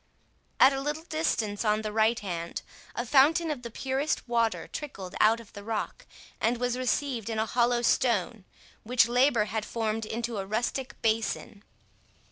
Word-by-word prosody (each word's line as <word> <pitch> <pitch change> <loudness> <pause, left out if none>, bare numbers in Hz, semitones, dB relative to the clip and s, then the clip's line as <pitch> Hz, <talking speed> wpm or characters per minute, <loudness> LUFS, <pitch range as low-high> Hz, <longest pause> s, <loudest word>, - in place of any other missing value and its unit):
At 270 +1 +7
a 270 - -2
little 300 +3 -3
distance 310 -11 -1
on 215 0 +1
the 215 - -3
right 220 +2 +2
hand, 170 -4 -4 0.3
a 240 - -2
fountain 305 +6 +4
of 280 -5 -4
the 235 - -6
purest 265 +4 -2
water 230 -2 0
trickled 195 -11 -7
out 220 +2 +5
of 230 -3 -14
the 205 - -9
rock, 220 0 -4 0.3
and 235 +2 +1
was 245 0 0
received 255 -2 -1
in 225 - -2
a 220 - +1
hollow 240 +1 +1
stone, 230 -3 +1 0.4
which 235 0 +3
labour 245 -2 +3
had 220 0 -3
formed 220 -1 -2
into 230 -1 -3
a 195 - -3
rustic 240 +5 -2
basin. 220 -2 -1
230 Hz, 165 wpm, -28 LUFS, 215-255 Hz, 0.4 s, At